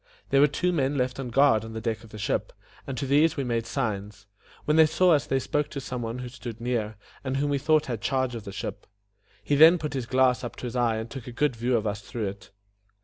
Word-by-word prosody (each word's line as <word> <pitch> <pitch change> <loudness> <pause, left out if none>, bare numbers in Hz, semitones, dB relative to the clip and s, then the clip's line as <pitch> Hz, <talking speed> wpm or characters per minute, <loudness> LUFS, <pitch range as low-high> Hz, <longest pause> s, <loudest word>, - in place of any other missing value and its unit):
There 135 0 +5
were 145 - +7
two 180 +5 0
men 140 -3 0
left 125 +1 -1
on 130 -2 -4
guard 120 -3 +4
on 110 0 -8
the 110 - -4
deck 110 0 -3
of 115 - -14
the 110 - -10
ship, 105 - -1 0.4
and 135 -2 -4
to 135 - -2
these 150 +5 +3
we 140 - 0
made 115 -2 -1
signs. 105 -5 -3 0.4
When 150 - +2
they 160 -1 +7
saw 180 +3 +3
us 145 -2 +1
they 135 - +1
spoke 150 +2 -1
to 140 - -5
some 125 -2 -5
one 115 +1 -4
who 125 -1 -6
stood 120 -2 -8
near, 115 -3 -2 0.3
and 135 0 -2
whom 145 +1 0
we 140 - +1
thought 155 +2 +3
had 120 -4 -4
charge 130 -1 0
of 115 -3 -6
the 100 - -7
ship. - - -6 0.6
He 110 - -1
then 160 +5 +8
put 150 -3 -4
his 130 -3 -3
glass 130 0 +3
up 120 - -5
to - - -11
his 120 0 -5
eye 120 -2 +2
and 110 +1 -4
took 130 0 -9
a - - -6
good 130 +2 0
view 120 +2 +1
of 110 - -3
us 105 -1 -2
through 105 +1 -4
it. 100 +2 -11
125 Hz, 265 wpm, -26 LUFS, 115-140 Hz, 0.6 s, then